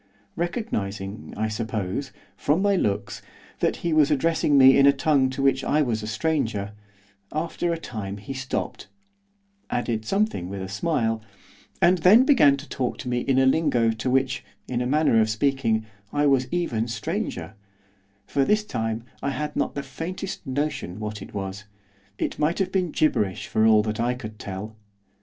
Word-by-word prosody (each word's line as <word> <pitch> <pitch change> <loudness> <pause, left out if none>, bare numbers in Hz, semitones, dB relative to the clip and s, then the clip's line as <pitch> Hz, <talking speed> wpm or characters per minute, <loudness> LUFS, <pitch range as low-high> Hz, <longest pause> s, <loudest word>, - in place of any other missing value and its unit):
Recognising, 110 - -3
I 110 - 0
suppose, 110 +2 -3 0.2
from 155 +7 +1
my 200 -1 +3
looks, 100 - -1 0.4
that - - +1
he 170 - +1
was 155 -2 +5
addressing 150 0 +2
me 135 0 +8
in 140 - +6
a - - +9
tongue 140 -3 +2
to 130 +1 -3
which 135 -1 +3
I 150 +1 +2
was 115 -5 -1
a 105 - -5
stranger, 110 -6 -1 0.6
after 165 +2 -2
a 165 - -1
time 105 -10 -6
he 120 +7 -7
stopped, 135 -1 -4 0.8
added 115 -2 -1
something 195 - 0
with 100 -1 -5
a 95 - -6
smile, 115 0 0 0.6
and 180 +1 +5
then 210 +10 +7
began 150 - +5
to 140 +2 -10
talk 125 -2 -2
to - - -7
me 120 0 +1
in 130 +1 +1
a 130 - +5
lingo 130 -5 +3
to 110 +3 -3
which, 130 +1 +1 0.2
in 125 -1 -1
a 125 - -1
manner 145 -5 +3
of 110 - +1
speaking, 110 -1 +1 0.3
I 145 0 +1
was 135 -2 +3
even 120 -10 -1
stranger, 120 - -3 0.7
for 140 - +1
this 210 +8 +2
time 115 - -3 0.2
I 140 - -1
had 150 +2 -3
not - - -1
the 140 - -3
faintest 180 +1 -6
notion 130 - -2
what 105 -1 -5
it 100 - -10
was, 100 +1 -5 0.5
it - - -3
might 155 +3 +1
have 190 -2 0
been 185 -3 +1
gibberish 105 - 0
for 110 0 +2
all 110 -1 +6
that 110 0 -3
I 120 +2 +1
could 110 -3 -9
tell. 100 +3 -6
130 Hz, 175 wpm, -25 LUFS, 110-155 Hz, 0.8 s, a